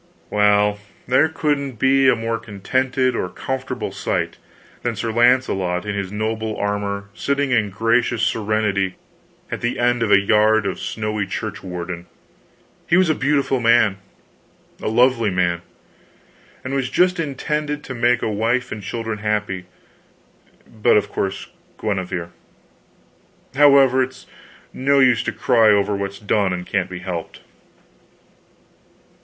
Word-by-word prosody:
Well, 105 0 +3 0.3
there 130 +5 +4
couldn't 145 -4 -1
be 135 +3 +3
a - - +4
more 115 0 -2
contented 125 +4 -1
or 90 - -2
comfortable 130 +5 -4
sight - - -2 0.4
than - - -2
Sir 115 - -3
Launcelot 110 -7 +2
in 105 - -2
his 100 -2 -4
noble 110 +1 -3
armor 100 -1 -2
sitting 140 +3 -1
in 110 -4 +2
gracious 115 +3 +1
serenity 105 -4 0 0.6
at - - -4
the 120 - -1
end 120 0 +1
of 115 - +1
a 100 - +7
yard 105 +1 +3
of 95 - -3
snowy 105 -2 -3
church 105 +2 -5
warden. 90 -1 -6 0.8
He 170 - +4
was 185 -4 +4
a - - +3
beautiful 140 -2 +1
man, 115 -4 +3 0.8
a - - -3
lovely 115 0 +3
man, 90 -2 0 1.0
and 130 - -4
was 135 -2 -1
just 180 0 +2
intended 150 0 -2
to 130 - -6
make 120 0 +1
a - - +1
wife 115 +4 0
and 105 - -5
children 110 +1 -4
happy. 105 -3 -2 1.0
But, 110 -1 +2
of 105 - 0
course 95 0 -3 0.3
Guenever 95 -4 -3 1.2
however, 135 -2 +6
it's 130 0 -4 0.5
no 140 +2 +2
use 125 -3 +4
to - - 0
cry 115 -3 +3
over 100 0 +3
what's 100 0 -4
done 100 -2 0
and 90 0 -4
can't 95 -1 -1
be 90 - -6
helped. 85 -3 -5
110 Hz, 140 wpm, -21 LUFS, 100-130 Hz, 1.2 s, a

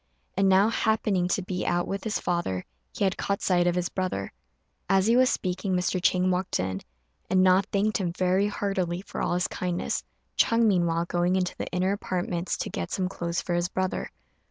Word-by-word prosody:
And 195 0 +3
now, 195 +3 +5
happening 215 -5 +1
to 190 +1 0
be 180 0 -3
out 175 0 0
with 195 0 -3
his 220 - 0
father, 135 - -2 0.3
he - - -3
had 190 -1 +1
caught 200 0 -1
sight 175 -2 +3
of 175 - +2
his 180 -1 0
brother. 185 - -3 0.6
As 195 0 +4
he 230 +2 +4
was 255 0 +5
speaking 185 -3 -1
Mr. 180 0 0
Chang 185 0 +3
walked 180 +1 -1
in, 95 +1 -2 0.5
and 185 0 +4
Na 185 +1 +6
thanked 210 +2 +1
him 180 -3 -1
very 185 +3 +2
heartily 190 -3 -2
for - - -6
all - - 0
his 180 - +1
kindness; 180 - -2 0.3
Ch'êng, 230 0 +4
meanwhile, 170 -5 +2
going 175 +1 +1
into 180 -2 0
the - - -4
inner 185 +2 0
apartments 180 -3 -2
to - - -3
get 85 - -3
some 185 -1 -1
clothes 170 -2 -3
for 175 - -2
his 175 0 0
brother. 185 0 -2
185 Hz, 200 wpm, -27 LUFS, 175-195 Hz, 0.6 s, Na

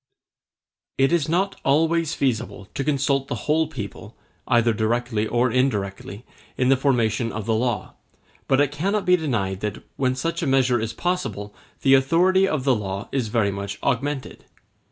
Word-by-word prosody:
It 135 +2 +3
is 165 -4 +1
not 185 +4 0
always 160 +3 +2
feasible 110 -6 -2
to 135 - -2
consult 140 -1 0
the - - -3
whole 155 +1 +2
people, 105 -6 -8 0.3
either 115 -1 +3
directly 110 0 0
or 120 +1 +1
indirectly, 105 -4 -1 0.3
in 130 0 +2
the 135 - +6
formation 120 -4 +1
of 110 -1 -5
the 115 - +1
law; 120 0 -1 0.5
but 135 - +3
it 145 -1 +2
cannot 195 +8 -1
be 180 - +5
denied 115 - -2
that, 105 0 -4
when 130 -1 +1
such 165 +6 -2
a - - -1
measure 130 -2 +3
is 110 0 -2
possible 115 - -3 0.3
the 135 - +5
authority 175 +8 +4
of 155 -7 -1
the 135 -1 +3
law 100 -1 -4
is 130 -4 -1
very 105 -2 +1
much 100 0 -5
augmented. 135 +2 -2
130 Hz, 165 wpm, -23 LUFS, 110-145 Hz, 0.5 s, the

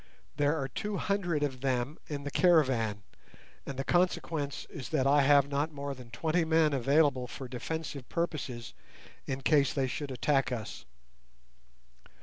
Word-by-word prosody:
There 145 +2 +2
are 135 - -2
two 205 - -4
hundred 175 -8 0
of 130 -3 -2
them 130 +2 -1
in 145 -2 -4
the 145 - -4
caravan, 130 - +3 0.6
and 140 - -5
the 135 - -1
consequence 165 -4 0
is 130 - -8
that 145 -4 +1
I 145 +1 +5
have 140 0 +5
not 145 +3 -1
more 140 -1 -4
than 125 -3 -12
twenty 160 +8 0
men 160 -2 +3
available 140 -1 +2
for 130 +2 -7
defensive 140 +1 -5
purposes 140 -8 -3 0.5
in 135 0 -3
case 140 -1 +3
they 135 -2 +1
should 140 +3 -4
attack 135 +1 +1
us. 115 -3 -5
140 Hz, 150 wpm, -30 LUFS, 130-155 Hz, 0.6 s, I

